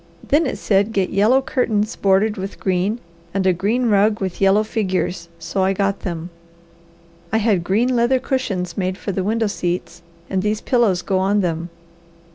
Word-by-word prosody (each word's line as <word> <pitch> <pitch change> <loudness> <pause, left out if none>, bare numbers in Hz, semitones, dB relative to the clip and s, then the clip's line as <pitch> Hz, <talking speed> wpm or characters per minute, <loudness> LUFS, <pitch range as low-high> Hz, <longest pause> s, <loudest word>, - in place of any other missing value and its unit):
Then 295 +2 +3
it - - -3
said 205 +2 +1
get 195 -3 0
yellow 225 +7 +3
curtains 220 -4 0
bordered 200 +2 +2
with 195 -1 -6
green 190 +4 0 0.4
and 195 -1 0
a 185 - +4
green 215 +8 0
rug 210 0 +3
with 190 -1 -4
yellow 195 +2 +4
figures, 185 -5 -2
so 190 +3 -3
I 190 +1 +2
got 195 0 0
them. 170 -1 -5 1.0
I 220 - +2
had 210 -5 +2
green 230 +8 +1
leather 240 +2 +3
cushions 225 -10 -2
made 185 -1 -2
for 200 - -4
the 190 0 -2
window 225 +3 0
seats, 175 -3 -3 0.3
and 190 -1 -1
these 210 +2 0
pillows 215 -9 +1
go 190 -2 0
on 200 +2 +2
them. 170 -1 -2
200 Hz, 175 wpm, -20 LUFS, 185-220 Hz, 1.0 s, a